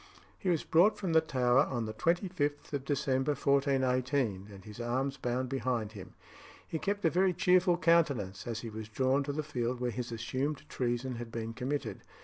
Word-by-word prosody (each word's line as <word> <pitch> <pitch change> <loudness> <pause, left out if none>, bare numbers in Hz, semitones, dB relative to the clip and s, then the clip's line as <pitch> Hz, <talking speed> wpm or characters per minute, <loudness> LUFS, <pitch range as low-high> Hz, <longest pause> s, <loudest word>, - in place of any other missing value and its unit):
He 190 - -1
was 170 -4 +1
brought 180 +7 +4
from 180 -4 -2
the 160 - +6
Tower 125 -4 +2
on 120 -3 -2
the 110 - -5
25th 165 - -1
of 140 -1 -2
December 140 -1 +1
1418, 130 -6 +1
and 95 -1 -12
his 105 +2 -8
arms 130 +4 -1
bound 125 +1 -1
behind 125 -5 -1
him. 100 -4 -11 0.5
He 160 - -3
kept 200 +1 -2
a 165 - +4
very 185 +1 +3
cheerful 180 0 +4
countenance 140 - +2
as 115 -1 -3
he 115 - -6
was 110 0 -7
drawn 130 +4 +2
to 145 - -2
the 155 +2 -2
field 125 -4 -2
where 125 -1 -1
his 120 +2 -4
assumed 130 +6 -3
treason 120 0 -2
had 120 -1 -7
been 115 0 -4
committed. 135 +4 -3
130 Hz, 185 wpm, -31 LUFS, 120-150 Hz, 0.5 s, the